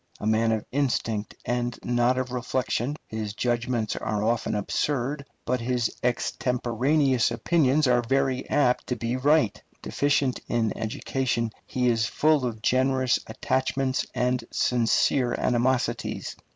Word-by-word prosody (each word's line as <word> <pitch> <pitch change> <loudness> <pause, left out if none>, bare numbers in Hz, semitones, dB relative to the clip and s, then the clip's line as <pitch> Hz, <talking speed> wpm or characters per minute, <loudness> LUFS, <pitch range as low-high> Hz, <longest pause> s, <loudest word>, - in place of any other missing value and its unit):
A - - -5
man 110 +1 +2
of 110 -1 -1
instinct 120 -6 -1
and 120 0 -1
not 120 +1 +2
of 130 -1 -2
reflection, 125 +1 -1
his 110 -2 -5
judgments 120 -1 -1
are 105 -1 -2
often 115 -1 0
absurd, 140 +6 -1 0.2
but 125 -1 0
his 120 -1 -1
extemporaneous 125 +2 +1
opinions 155 -3 +2
are 125 -1 +3
very 130 +1 0
apt 125 -4 +2
to 125 - -1
be 115 +1 -2
right. 145 -2 +2 0.2
Deficient 140 -2 +1
in 115 -3 0
education, 115 +1 -2 0.2
he 125 -1 0
is 115 -2 +2
full 150 -1 +2
of 110 -2 -6
generous 130 0 +2
attachments 130 +3 -1
and 125 0 0
sincere 120 +1 +2
animosities. 125 +1 0
125 Hz, 125 wpm, -26 LUFS, 115-130 Hz, 0.2 s, are